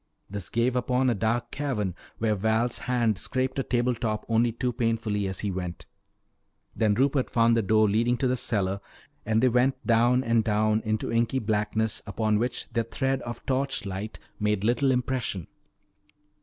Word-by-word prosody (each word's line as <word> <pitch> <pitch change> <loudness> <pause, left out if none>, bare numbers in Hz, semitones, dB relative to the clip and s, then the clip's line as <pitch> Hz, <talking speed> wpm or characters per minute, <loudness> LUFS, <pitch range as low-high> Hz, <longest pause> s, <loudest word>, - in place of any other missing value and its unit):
This 100 -3 -5
gave 120 +2 +1
upon 125 +1 +2
a - - +2
dark 115 +3 -1
cavern 120 -10 -2 0.2
where 110 -1 +1
Val's 110 +4 +1
hand 120 -5 0
scraped 130 +5 -1
a - - 0
table 125 0 +1
top 110 -2 -3
only 115 +1 +2
too 120 +2 -2
painfully 110 -3 -1
as 95 - -3
he 100 - -1
went. 90 -2 -5 0.9
Then 105 -2 +2
Rupert 135 +2 +1
found 115 0 +3
the 115 - +3
door 110 +1 +3
leading 115 +4 +2
to 130 - +1
the 125 - +1
cellar, 100 -6 0 0.5
and 110 +2 +2
they - - +6
went 125 +3 +1
down 120 +2 +3
and 115 -2 +2
down 110 0 +2
into 110 0 -1
inky 115 +3 +1
blackness 110 -1 0
upon 105 0 +1
which 120 +1 -2
their 115 -1 0
thread 135 +2 -1
of 120 0 -7
torch 135 -3 -1
light 100 +3 -5 0.2
made 105 -2 0
little 125 +5 +2
impression. 125 -8 -1
115 Hz, 170 wpm, -27 LUFS, 105-125 Hz, 0.9 s, they